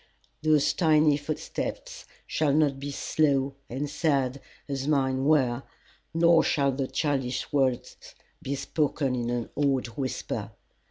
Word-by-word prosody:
Those 150 -2 +3
tiny 155 -3 +4
footsteps 145 +1 -5 0.2
shall 150 -3 +1
not 145 -3 +2
be 140 +1 -5
slow 140 -1 +1 0.2
and 135 +5 -3
sad 140 -3 0 0.3
as 135 -1 -3
mine 135 -3 +1
were, 130 -5 +3 0.5
nor 165 0 +5
shall 140 -2 +2
the 135 0 -2
childish 135 -5 -2
words 130 -4 -1 0.3
be 140 - -3
spoken 140 -2 -1
in 120 -1 -2
an 120 -1 -2
awed 140 -3 +1
whisper. 130 +2 -4
140 Hz, 125 wpm, -27 LUFS, 130-150 Hz, 0.5 s, nor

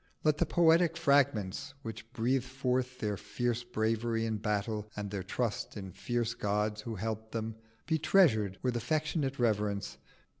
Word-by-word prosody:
Let 155 0 +3
the - - +2
poetic 165 0 +4
fragments 140 - +2
which 115 0 -7
breathe 125 +2 +1
forth 130 -1 -1
their 105 -4 -2
fierce 120 +2 -2
bravery 115 0 0
in 110 -1 -1
battle 105 +1 -2
and 105 -1 -4
their 100 -2 -2
trust 105 +3 -2
in 95 -2 -6
fierce 120 +3 -1
gods 105 0 -1
who 115 0 -5
helped 110 +2 -4
them, 110 -1 -3 0.3
be 160 -1 +1
treasured 110 - +4
with 125 -2 +1
affectionate 145 +3 0
reverence. 105 -4 0
115 Hz, 150 wpm, -32 LUFS, 105-130 Hz, 0.3 s, poetic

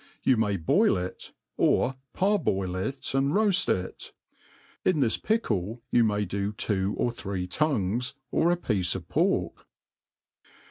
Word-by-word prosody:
You 130 - +4
may 105 -3 +1
boil 80 +1 +3
it, 90 +1 -6 0.3
or 135 - +2 0.2
parboil 150 - +1
it 135 +10 -3
and 135 +1 +1
roaft 205 -2 +3
it. 90 0 -3 0.7
In 180 -5 +2
this 120 -5 +2
pickle 115 - -1
you 120 - +5
may 105 -2 +1
do 100 +2 -2
two 100 -1 -1
or 120 - +1
three 95 -5 -4
tongyes, 125 0 0 0.2
or 165 - +3
a 175 - +2
piece 100 - 0
of 85 -3 -6
pork. - - 0
110 Hz, 140 wpm, -27 LUFS, 95-140 Hz, 0.7 s, you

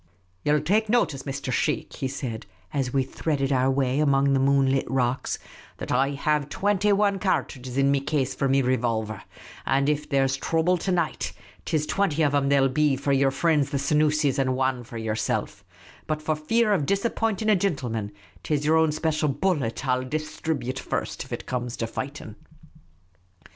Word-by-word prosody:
" 90 0 -40
Ye - - -1
'11 150 0 +2
take 210 +5 +2
notice, 210 - +1
Mr. 135 -2 -4
Sheikh," 150 +4 -1
he 135 - -2
said, 125 -5 -5 0.3
as 135 -3 -1
we 135 0 +2
threaded 135 0 -2
our 130 0 +3
way 135 0 +1
among 140 -2 +3
the 135 - +3
moon 135 0 +3
lit 135 -2 0
rocks, 130 0 0 0.2
" - - -21
that - - -6
I 135 +3 +2
have 150 0 0
twinty 205 +3 +1
wan 200 -1 +2
cartridges 130 -9 -2
in 140 0 +4
me 140 - +3
case 140 -1 -1
for 140 - -1
me 135 0 +3
revolver; 115 -4 -1 0.4
and 135 +1 +1
that - - +4
if 150 0 -3
there 135 -1 +3
's 135 +1 -2
throuble 165 +4 +1
to 190 - -1
night, 170 -3 -1 0.3
't - - -1
is 150 - -1
twinty 165 -4 +1
of 145 - +3
them 140 -1 +1
there 140 -1 +4
'11 135 -1 +2
be 150 -1 +3
for 140 +1 0
your 135 0 +3
frinds 145 0 +1
the 140 - -1
Senoosis, 150 0 +2
and 130 -1 +1
wan 130 -1 0
for 115 0 -9
yerself; 110 -1 -2 0.4
but 155 0 -1
for 155 0 -1
fear 215 +8 +2
of 150 -8 0
dis 200 +2 +1
appointing 220 -2 0
a - - +5
gintleman, 125 - -1 0.3
't 150 - -1
is 145 0 -2
yer 160 +1 +4
own 160 -1 +3
special 155 -1 0
bullet 140 -5 -1
I 130 - +3
'11 130 0 -5
dis 155 +1 -3
thribute 130 -5 -2
first, - - -3
if - - -18
it - - -5
comes 125 -1 -3
to 115 - -1
fighting." 130 -2 -6
140 Hz, 205 wpm, -25 LUFS, 130-155 Hz, 0.4 s, a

